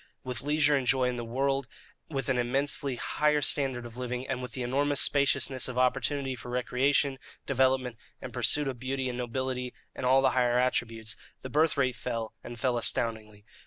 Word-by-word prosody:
With 125 -4 -5
leisure 150 0 +3
and 135 -3 -1
joy 130 0 +3
in 125 - -3
the 120 - -3
world; 135 +3 -1 0.4
with 135 -5 -3
an 130 -2 +1
immensely 135 +2 +1
higher 150 +4 +1
standard 130 -5 +1
of 120 0 -10
living; 125 +1 -4
and 130 -1 -2
with 125 -2 -7
the 130 - -3
enormous 140 +3 +1
spaciousness 140 -2 +2
of 125 -1 -6
opportunity 135 +2 +1
for 125 -1 -9
recreation, 130 +2 +1 0.3
development, 130 -2 +1 0.2
and - - -8
pursuit 150 -1 +2
of 130 -3 -4
beauty 130 +1 -2
and 125 - -4
nobility 125 +1 -3 0.2
and - - -7
all 130 +2 +4
the 130 - +4
higher 125 -1 +2
attributes, 115 -2 -1 0.3
the 130 - -6
birth 155 +2 +2
rate 130 -3 +1
fell, 115 -3 -4
and 120 -1 -8
fell 125 -2 +1
astoundingly. 110 -3 -1
130 Hz, 185 wpm, -29 LUFS, 120-135 Hz, 0.4 s, all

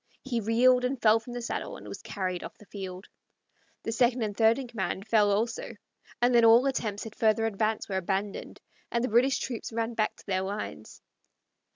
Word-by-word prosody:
He 245 -3 -1
reeled 250 +4 +4
and 250 +1 -1
fell 220 0 +5
from 240 +2 -10
the 245 -1 -5
saddle, - - -4
and - - -12
was - - -8
carried 185 -3 -3
off - - -9
the 210 - -16
field. 190 -2 -7 0.8
The - - -2
second 240 +1 +2
and 205 -2 -3
third 225 +1 +4
in 270 -2 -5
command 195 -3 -4
fell 210 -2 +4
also, 230 +2 -1 0.4
and 245 +1 +3
then 235 -1 +6
all 230 +3 +7
attempts 220 -7 -2
at 220 - -8
further 220 0 +2
advance 220 0 -1
were 190 -2 -2
abandoned, 195 +2 -3 0.3
and 235 0 0
the 255 - 0
British 250 +4 +3
troops 235 -3 -5
ran 230 +1 -2
back 215 -1 0
to - - -18
their 185 -2 0
lines. 200 +2 -6
225 Hz, 200 wpm, -28 LUFS, 205-240 Hz, 0.8 s, all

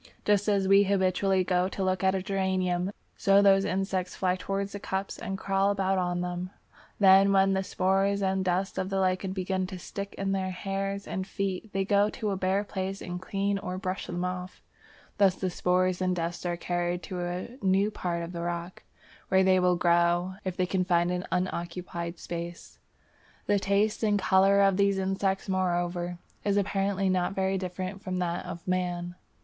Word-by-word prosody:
Just 205 0 +2
as 200 -2 +2
we 195 +1 +6
habitually 190 -1 +2
go 180 0 +1
to 195 - -3
look 185 0 0
at 190 0 +3
a 190 - -2
geranium, 190 -1 0 0.3
so 195 0 +5
those 195 -1 +5
insects 190 -1 -1
fly 185 -1 +1
towards 195 +2 -3
the 205 - -6
cups 190 0 -4
and 195 0 -4
crawl 195 0 +1
about 195 -1 +1
on 175 -1 -1
them. 180 0 -3 0.5
Then 195 0 +7
when 195 0 +4
the 190 - +1
spores 195 +1 +1
and 190 0 +1
dust 185 +1 -1
of 185 - -2
the 195 -1 0
lichen 185 0 0
begin 185 0 -2
to 185 - -7
stick 200 +2 -7
in 195 0 -1
their 190 -1 -1
hairs 195 +1 -3
and 190 -1 -4
feet, 195 +1 -3
they 195 0 0
go 200 +1 +3
to 215 -2 -3
a - - 0
bare 190 +2 +1
place 195 -1 -4
and 180 0 -6
clean 200 +1 -1
or 185 -1 -4
brush 185 0 -4
them 175 +1 -2
off. 180 0 -5 0.6
Thus 195 -2 +5
the 185 -1 -2
spores 180 +1 +1
and 185 0 +1
dust 175 +1 -3
are 175 0 -1
carried 175 0 -2
to 185 - -5
a 175 +4 -3
new 195 +2 +2
part 170 -4 -3
of 170 - -6
the 170 -1 -5
rock, 170 +1 -4 0.5
where 190 0 +4
they 185 0 +4
will 180 0 +3
grow 175 +1 +2
if 185 -2 -4
they 185 - +2
can 185 0 0
find 175 -1 +2
an 180 0 -3
unoccupied 175 -1 -3
place. 170 0 -7 0.7
The 205 -1 +2
taste 205 +3 +1
in 210 -1 +3
colour 195 0 +4
of 195 -1 +4
these 200 -1 +3
insects, 195 +1 -1
moreover, 175 -2 -1 0.3
is 205 -1 +1
apparently 195 -1 0
not 185 0 +1
very 190 0 0
different 185 +1 -5
from 185 -2 -3
that 175 -1 -2
of 170 +2 -8
man. 175 -1 -1
190 Hz, 190 wpm, -28 LUFS, 180-195 Hz, 0.7 s, Then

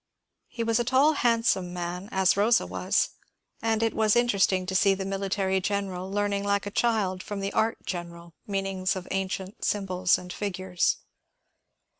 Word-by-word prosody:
He 230 - -4
was 230 0 +1
a - - +2
tall, 265 +6 +4
hand 235 -4 +2
some 180 -4 +1
man 180 +2 -5
as 190 -1 +3
Rosa 220 +4 +3
was, - - 0 0.5
and 225 0 +1
it 225 - +1
was 215 0 +3
interesting 200 -6 +2
to 190 - -4
see 195 +1 +4
the 190 - -4
mili 195 0 -3
tary 190 -1 +1
general 190 -2 -2
learning 200 0 0
like 200 0 0
a 205 - -4
child 205 -5 +1
from 205 +1 -5
the 195 0 -3
art 225 +1 +1
general 170 -1 -6
mean 195 -1 -1
ings 190 -1 -1
of 185 -1 -6
ancient 190 0 -3
symbols 185 -3 +1
and 180 0 -8
figures. 185 -3 -1
195 Hz, 175 wpm, -27 LUFS, 185-210 Hz, 0.5 s, tall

